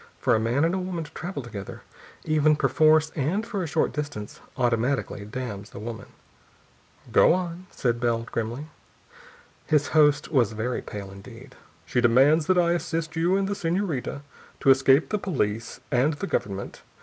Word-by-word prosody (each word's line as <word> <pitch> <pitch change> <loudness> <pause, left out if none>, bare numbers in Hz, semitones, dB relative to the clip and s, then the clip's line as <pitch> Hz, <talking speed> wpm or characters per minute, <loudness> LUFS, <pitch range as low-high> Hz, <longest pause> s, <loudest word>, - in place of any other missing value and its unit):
For - - +2
a 110 - +3
man 120 +7 +1
and 170 - +1
woman 180 -3 -3
to 155 - -12
travel 165 -3 -5
together, 105 -5 -8 0.4
even 155 -1 +3
perforce 155 +3 +3
and 165 +10 -1
for 200 -4 -3
a 170 - -2
short 155 +1 0
distance, 145 -9 -5 0.2
automatically 120 -3 0
damns 105 -3 -6
the - - -10
woman. 110 +1 -7 1.0
"Go - - +6
on," 180 0 -4
said 120 -2 -1
Bell 115 -1 0
grimly. 115 +4 -4 1.0
His 150 -2 +2
host 150 0 +3
was 120 -7 +2
very 115 +3 -2
pale 100 -2 -8
indeed. 120 +6 -12 0.3
"She 125 - 0
demands 135 +7 +4
that 185 - +3
I 170 -1 +3
assist 165 -2 -2
you 175 +4 +2
and 195 -1 0
the 200 - -1
senorita 170 -7 -2 0.4
to - - +3
escape 135 +2 +4
the 210 - -1
police 115 - -2
and 135 +4 +3
the 150 - -4
government. 100 - -3
140 Hz, 160 wpm, -25 LUFS, 115-165 Hz, 1.0 s, Go